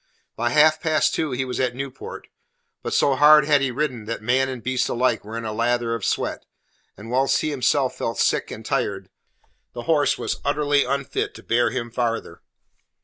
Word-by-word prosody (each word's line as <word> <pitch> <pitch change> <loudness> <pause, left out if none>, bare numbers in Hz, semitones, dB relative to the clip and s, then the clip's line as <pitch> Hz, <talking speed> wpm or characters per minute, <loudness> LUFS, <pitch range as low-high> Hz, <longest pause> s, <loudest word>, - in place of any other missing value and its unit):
By 120 +1 0
half 155 +4 +4
past 155 -2 +2
two 160 -2 -1
he 130 +1 -2
was 125 - -4
at 125 -2 0
Newport. 135 0 -7 0.5
But - - -4
so 140 - +3
hard 150 +1 +7
had 145 -1 +3
he 135 - +1
ridden 125 -4 -3
that 115 0 -5
man 130 +3 +2
and 125 -3 -6
beast 130 0 0
alike 125 +2 0
were 110 +2 -7
in 115 - -5
a 110 - -3
lather 120 +1 0
of 115 -3 -4
sweat, - - -1 0.5
and 115 +3 -9
whilst 135 +2 +2
he 155 - -1
himself 135 -1 +1
felt 115 - -2
sick - - +1
and - - -9
tired, - - -2 0.6
the 120 - -6
horse 150 -2 +2
was - - -3
utterly 145 0 +1
unfit 140 -1 -2
to - - -12
bear 120 +1 +2
him 120 -2 -4
farther. 115 -1 -3
130 Hz, 195 wpm, -23 LUFS, 120-145 Hz, 0.6 s, hard